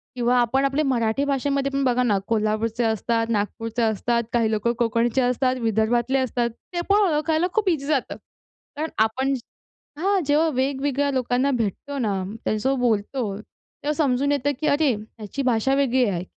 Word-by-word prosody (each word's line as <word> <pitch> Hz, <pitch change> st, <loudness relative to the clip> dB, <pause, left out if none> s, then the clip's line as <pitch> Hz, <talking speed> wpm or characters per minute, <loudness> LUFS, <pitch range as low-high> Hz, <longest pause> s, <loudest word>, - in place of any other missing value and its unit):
किंवा 245 Hz, 0 st, +2 dB
आपण 265 Hz, +3 st, +2 dB
आपले 275 Hz, +3 st, +1 dB
मराठी 240 Hz, -1 st, +1 dB
भाषेमध्ये 275 Hz, 0 st, 0 dB
पण 275 Hz, 0 st, 0 dB
बघा 250 Hz, -1 st, +2 dB
ना. 210 Hz, -5 st, +2 dB
कोल्हापूरचे 220 Hz, +1 st, 0 dB
असतात, 225 Hz, +1 st, 0 dB
नागपूरचे 225 Hz, +2 st, -2 dB
असतात, 235 Hz, +2 st, +1 dB
काही 225 Hz, -2 st, +2 dB
लोकं 220 Hz, +2 st, 0 dB
कोकणचे 235 Hz, +2 st, +1 dB
असतात, 255 Hz, +1 st, +1 dB
विदर्भातले 230 Hz, +4 st, +1 dB
असतात, 240 Hz, -2 st, 0 dB, 0.2 s
ते 345 Hz, -, -1 dB
पण 410 Hz, +1 st, +5 dB
ओळखायला 315 Hz, +3 st, +1 dB
खूप 425 Hz, -4 st, +2 dB
ईझी 290 Hz, -5 st, -1 dB
जातं. 285 Hz, -4 st, -1 dB, 0.6 s
कारण 315 Hz, +1 st, -2 dB, 0.2 s
आपण 265 Hz, +5 st, -1 dB, 0.7 s
हां. 390 Hz, +2 st, +2 dB
जेव्हा 305 Hz, +3 st, +3 dB
वेगवेगळ्या 275 Hz, +2 st, 0 dB
लोकांना 255 Hz, +1 st, +1 dB
भेटतो 250 Hz, +4 st, -2 dB
ना 200 Hz, -6 st, -1 dB, 0.2 s
त्यांचं 260 Hz, +5 st, 0 dB
बोलतो 220 Hz, -2 st, 0 dB, 0.5 s
तेव्हा 295 Hz, +1 st, 0 dB
समजून 280 Hz, -2 st, +1 dB
येतं, 285 Hz, 0 st, +1 dB
की 305 Hz, -, -1 dB
अरे 285 Hz, -2 st, +3 dB
ह्याची 215 Hz, +4 st, -7 dB
भाषा 250 Hz, +1 st, +2 dB
वेगळी 260 Hz, -2 st, +2 dB
आहे. 180 Hz, -2 st, -2 dB
250 Hz, 160 wpm, -23 LUFS, 225-280 Hz, 0.7 s, पण